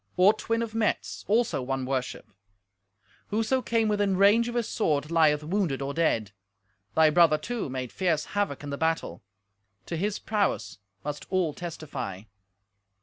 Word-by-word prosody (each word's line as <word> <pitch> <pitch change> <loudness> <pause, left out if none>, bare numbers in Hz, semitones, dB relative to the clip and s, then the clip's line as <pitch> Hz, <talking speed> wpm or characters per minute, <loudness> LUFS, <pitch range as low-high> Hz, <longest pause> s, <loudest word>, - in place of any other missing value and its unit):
"Ortwin 215 +4 +3
of 225 -1 -6
Metz, 225 -1 -1
also, 220 - +2
won 135 0 -2
worship. 130 -1 -3 1.0
Whoso 225 +5 +1
came 230 -2 +1
within 205 -2 +1
range 210 +4 +5
of 240 - -5
his 235 -2 0
sword 150 -6 0
lieth 155 -3 +4
wounded 170 -4 0
or 140 +1 -3
dead. 115 -11 +1 0.6
Thy 160 -1 +5
brother, 165 -1 +5
too, 230 - -4
made 130 -2 -4
fierce 165 -5 0
havoc 205 -9 -1
in 145 - -5
the 140 - -4
battle. 160 - -1 0.6
To - - -4
his 200 +5 -1
prowess 205 - -1 0.3
must 150 0 -5
all 180 -5 +1
testify. 135 - -6
170 Hz, 145 wpm, -27 LUFS, 145-210 Hz, 1.0 s, range